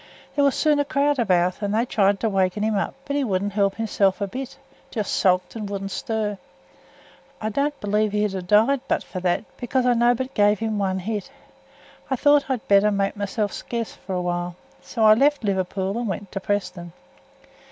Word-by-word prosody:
There 285 - +3
was 280 -1 +3
soon 300 -2 +2
a - - +3
crowd 285 0 +1
about, 185 -4 +2
and 205 0 -1
they 230 +2 +2
tried 200 -4 +2
to 225 - +1
wakken 195 0 0
him 220 0 +1
up; 195 - -1
but 280 - -3
he 285 - +1
wouldn't 200 -3 -1
help 200 -1 +1
hisself 200 -4 +1
a 200 - 0
bit 255 +6 -7 0.3
just 215 -4 -3
sulked 180 +1 +2
and 210 -3 -5
wouldn't 195 -1 -4
stir. 210 -2 -2 1.0
I 215 - -2
don't 280 +6 -1
believe 210 +1 0
he'd 210 -1 0
ha' 190 - -3
died 220 +8 +3
but - - 0
for 185 - -6
that, 180 +3 0
because 250 +1 0
I 250 - +4
nobbut 245 +2 +1
give 205 0 +3
him 220 -1 -2
but 200 - +1
one 190 0 -1
hit. 210 0 -4 0.8
I 265 - +1
thowt 290 +2 +3
I'd 255 -4 -2
better 200 +1 +5
make 200 0 0
mysel' 205 +1 -2
scarce 230 +2 -5
for 190 - -6
a 180 - -1
while, 175 0 -2 0.3
so 230 - -3
I 215 - +9
left 285 +4 +2
Liverpool 190 0 -1
and 235 0 -2
went 195 0 -5
to 195 - -3
Preston. 180 -4 -3
210 Hz, 205 wpm, -23 LUFS, 195-235 Hz, 1.0 s, I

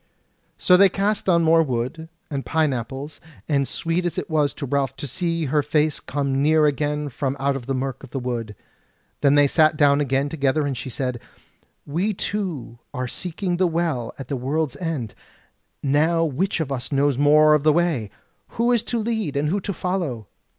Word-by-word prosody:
So 180 - +5
they 195 +1 +7
cast 200 +1 -1
on 170 -2 +4
more 165 0 +5
wood, 130 +3 -3 0.2
and 140 -2 -2
pineapples, 140 -2 -2 0.3
and 140 -3 +1
sweet 165 +2 -1
it - - -3
was 150 -2 +2
to 145 - -5
Ralph 135 0 -1
to - - -5
see 165 +3 -2
her 150 +2 +2
face 150 +1 +1
come 140 -1 -2
clear 155 +1 +4
again 150 +1 0
from 135 +1 -3
out 140 +1 +1
the 135 +3 -3
mirk 130 0 -3
of 135 - -11
the 135 - -5
wood. 120 -4 -4 0.7
Then 140 0 +4
they 145 0 +6
sat 155 +2 +3
down 145 -1 +4
again 135 0 +1
together 145 0 0
and 140 -2 -2
she 130 - -6
said: 125 -1 -3 0.7
"We 185 +8 -1
two 170 - -4 0.2
are 125 0 -2
seeking 180 +5 -3
the 185 0 +3
Well 160 -8 -1
at 135 - -8
the 140 - -2
World's 135 +2 -1
End; 155 - -3 0.7
now 155 +4 +2
which 165 +6 -1
of 150 -4 -2
us 130 0 -4
knows 140 -1 +2
more 150 +1 +6
of 150 - +3
the 155 +1 +4
way? 155 -10 +1 0.5
who 235 +2 +2
is 240 -3 +3
to 240 - -2
lead, 220 -10 -2
and 150 +1 +1
who 200 +5 0
to 200 - -3
follow?" 175 - -3
145 Hz, 185 wpm, -23 LUFS, 135-165 Hz, 0.7 s, they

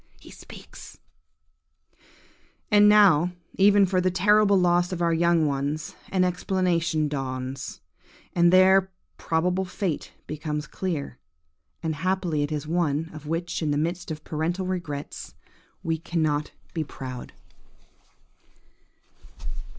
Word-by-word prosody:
He - - -14
speaks– - - -12 1.7
"And 210 0 +7
now, 180 -5 +5 0.2
even 200 0 +5
for 185 0 +1
the 185 - +2
terrible 200 +2 +4
loss 175 0 +2
of 180 - -3
our 170 -1 +2
young 170 -1 +3
ones, 145 +2 -2 0.2
an 185 -1 +2
explanation 180 -3 0
dawns, 130 -2 -5 0.5
and 175 0 +4
their 190 +1 +5 0.3
probable 180 +3 0
fate 185 -3 -3
becomes 150 0 -4
clear; 150 -6 -4 0.6
and 160 -1 -1
happily 180 -1 -1
it 145 +1 -2
is 150 -1 -3
one, 160 -1 -1
of 155 -1 -10
which, 165 +3 -2
in 155 - 0
the 145 - +1
midst 170 +4 -2
of 155 -1 -6
parental 170 +4 -2
regrets, 170 -6 -5 0.5
we 165 -1 -1
cannot 155 -3 0 0.2
but - - -33
be 160 - -1
proud. 130 -3 -8
170 Hz, 120 wpm, -25 LUFS, 150-185 Hz, 1.7 s, And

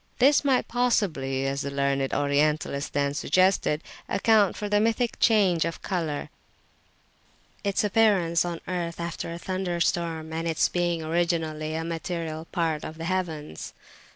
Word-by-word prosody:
This 275 +4 +5
might 270 -3 +2
possibly, 170 - 0
as 135 0 -1
the 140 - -3
learned 140 -1 0
Orientalist 145 0 0
then 140 0 0
suggested, 170 0 +2 0.3
account 210 -2 +3
for 210 - -3
the 205 0 +2
mythic 230 +2 0
change 195 -7 +4
of 165 0 -4
colour, 165 -6 -3 1.3
its 200 +1 +1
appearance 200 -6 +3
on 170 -1 -4
earth 170 -2 -3
after 170 0 -4
a 170 - -5
thunderstorm, 170 -3 -2
and 165 +1 -2
its 165 -1 +2
being 175 -2 0
originally 160 -2 -1
a 160 - -2
material 165 -1 -4
part 165 -4 -1
of 160 - -7
the 165 - -5
heavens. 165 - -3
170 Hz, 140 wpm, -26 LUFS, 155-185 Hz, 1.3 s, This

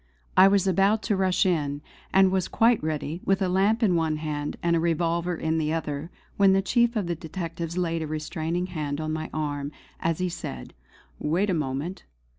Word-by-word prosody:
I 190 - +8
was 195 -1 +3
about 195 +3 +3
to 205 - +1
rush 190 -1 +2
in, 145 -5 0 0.3
and 190 -1 +5
was 190 -2 0
quite 230 +1 +3
ready, 155 +2 -3
with 195 0 +2
a 190 - +1
lamp 200 +6 +2
in 195 -5 +4
one 160 -2 +1
hand 150 -1 -3
and 170 0 +3
a - - +2
revolver 170 +1 0
in 160 0 -1
the 155 -1 0
other, 150 -1 -3 0.3
when 195 -1 +5
the 195 - +3
chief 235 +4 +2
of 210 -4 0
the 170 - -1
detectives 165 +1 -5
laid 165 -2 0
a 160 - -3
restraining 160 +3 -2
hand 150 -5 -4
on 155 0 -2
my 155 0 -4
arm 145 -2 -3 0.3
as 165 -1 0
he 185 - 0
said: 65 - -6 0.5
"Wait 185 +7 +1
a - - +1
moment. 150 +3 -3
170 Hz, 200 wpm, -26 LUFS, 155-190 Hz, 0.5 s, I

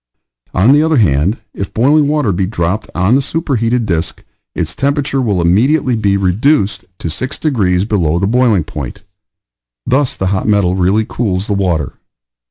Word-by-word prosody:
On 100 +8 +4
the 145 +1 +5
other 160 -1 +2
hand, 85 - +2 0.2
if 100 - -5
boiling 145 +5 +3
water 145 -7 +1
be 95 +1 -1
dropped 95 +1 -2
on 95 +6 +2
the 135 - +4
superheated 125 -6 -1
disk 85 -5 -3 0.3
its - - -2
temperature 140 -1 0
will 105 -7 0
immediately 120 - +2
be 100 -3 +1
REDUCED 100 - +1
to - - -5
six 130 - -3
degrees 100 - 0
below 85 -7 0
the 95 - 0
boiling 115 -4 +2
point; 75 -4 -7 0.8
thus 130 +1 0
the 95 - -2
hot 95 - -2
metal 100 -4 +2
really 95 +4 +1
cools 100 -7 -2
the 105 - -2
water. 90 -8 -1
105 Hz, 165 wpm, -14 LUFS, 90-130 Hz, 0.8 s, the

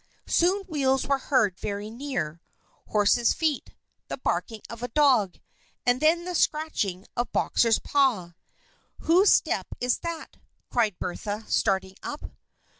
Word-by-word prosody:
Soon 375 +4 +2
wheels 270 -7 0
were 275 0 +1
heard 230 -10 +1
very 205 +1 -4
near 180 - -4 0.5
horse's 215 +3 +3
feet 310 -4 -1 0.3
the - - -4
barking 225 -3 -2
of 230 0 -9
a 245 - -2
dog 250 -8 +3 0.5
and 245 +1 +2
then 335 +3 +3
the 360 - -4
scratching 260 - 0
of 240 -1 -2
Boxer's 230 -2 +2
paw. 240 -12 +1 0.7
"Whose 365 +5 +5
step - - +2
is 245 0 +1
that?" 335 -2 -6 0.3
cried 220 -6 +1
Bertha, 205 +4 -4
starting 190 -2 0
up. 295 - -6
245 Hz, 130 wpm, -26 LUFS, 205-300 Hz, 0.7 s, Whose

